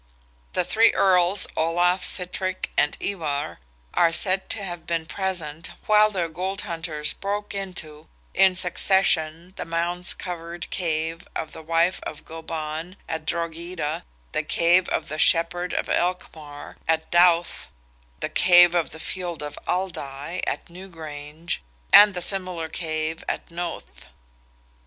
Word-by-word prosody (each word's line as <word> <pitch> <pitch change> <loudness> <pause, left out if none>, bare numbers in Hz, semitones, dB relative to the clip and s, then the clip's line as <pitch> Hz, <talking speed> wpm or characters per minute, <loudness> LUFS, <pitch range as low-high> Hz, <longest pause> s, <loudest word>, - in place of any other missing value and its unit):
The - - +1
three 225 +6 +5
Earls, 185 0 +5
Olaf, 175 +3 +2
Sitrick, 185 +1 -1
and 145 - +2
Ivar, 145 - -3 0.3
are 170 -1 +4
said 190 +2 0
to 210 - -1
have 175 -3 -6
been 165 -1 -1
present, 165 -3 -4 0.2
while 215 0 +5
their 185 -5 -1
gold 185 +4 -4
hunters 165 -3 -2
broke 205 +1 -4
into 180 -6 -5 0.3
in 190 -1 +5
succession 180 -2 +1
the - - -3
mound 170 +2 -1
covered 170 -1 -6
cave 165 -1 -2
of 160 - -4
the - - -10
wife 165 +3 +1
of 155 - -8
Goban, 160 +1 -6
at 160 -1 -4
Drogheda, 170 -1 -3 0.3
the - - 0
cave 175 +2 +3
of 155 - -1
"the 155 0 -5
Shepherd 175 +3 +2
of - - -1
Elcmar," 160 -5 -3
at 160 0 0
Dowth, 175 0 +3 0.5
the - - 0
cave 175 -1 +7
of 170 -2 +1
the 160 - -9
field 175 -2 -4
of 145 - -6
Aldai, 175 -3 -3
at - - -2
New 180 +3 -11
Grange, 155 -1 -6 0.3
and 205 -1 +9
the 180 - +2
similar 180 -4 +1
cave 160 -1 -3
at - - -4
Knowth. 170 0 -7
170 Hz, 140 wpm, -24 LUFS, 160-185 Hz, 0.5 s, and